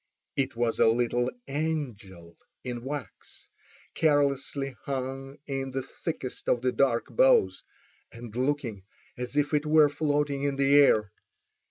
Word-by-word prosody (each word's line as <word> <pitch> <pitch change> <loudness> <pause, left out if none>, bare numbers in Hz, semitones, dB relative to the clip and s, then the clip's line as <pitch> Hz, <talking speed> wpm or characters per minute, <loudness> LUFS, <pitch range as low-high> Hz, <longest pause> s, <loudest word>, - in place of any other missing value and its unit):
It 135 -2 -1
was 115 -1 0
a - - +6
little 120 +1 +1 0.2
angel 120 - -4 0.3
in 120 -2 -5
wax 135 -7 -8 0.5
carelessly 140 -2 +1
hung 135 +1 -4
in 135 -1 -3
the 135 0 -3
thickest 135 -4 -5
of 120 - +1
the 130 - +2
dark 125 -4 0
boughs, - - +4 0.5
and 115 -2 -10
looking 130 -5 -1 0.3
as 125 +3 -5
if 145 +1 +1
it 150 0 +1
were 155 -1 +6
floating 145 -1 0
in 140 -1 0
the 140 0 +2
air. 110 -8 +5
135 Hz, 135 wpm, -28 LUFS, 120-145 Hz, 0.5 s, a